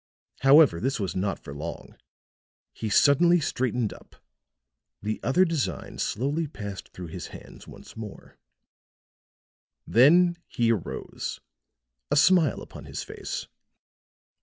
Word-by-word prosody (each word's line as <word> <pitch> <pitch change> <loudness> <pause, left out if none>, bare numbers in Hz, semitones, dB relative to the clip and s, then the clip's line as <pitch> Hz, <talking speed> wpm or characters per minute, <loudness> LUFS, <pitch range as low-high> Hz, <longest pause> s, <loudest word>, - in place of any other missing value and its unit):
However, 135 - +6
this 135 +2 -1
was 95 -3 -3
not 95 0 -1
for 70 - -10
long; 80 +4 -7 0.8
he 110 - -4
suddenly 170 +10 +5
straightened 125 -6 -1
up; - - -17 0.9
the 110 +1 -2
other 180 +8 +3
designs 135 - -3
slowly 145 +8 -1
passed 100 -8 -8
through 90 -2 -9
his 85 0 -7
hands - - -13
once - - -13
more; 110 -3 -10 1.5
then 170 +8 +5
he 115 -1 +1
arose, 105 -7 -4 0.7
a 145 - +1
smile 165 -1 +4
upon - - -11
his - - -5
face. - - -6
125 Hz, 115 wpm, -26 LUFS, 100-150 Hz, 1.5 s, However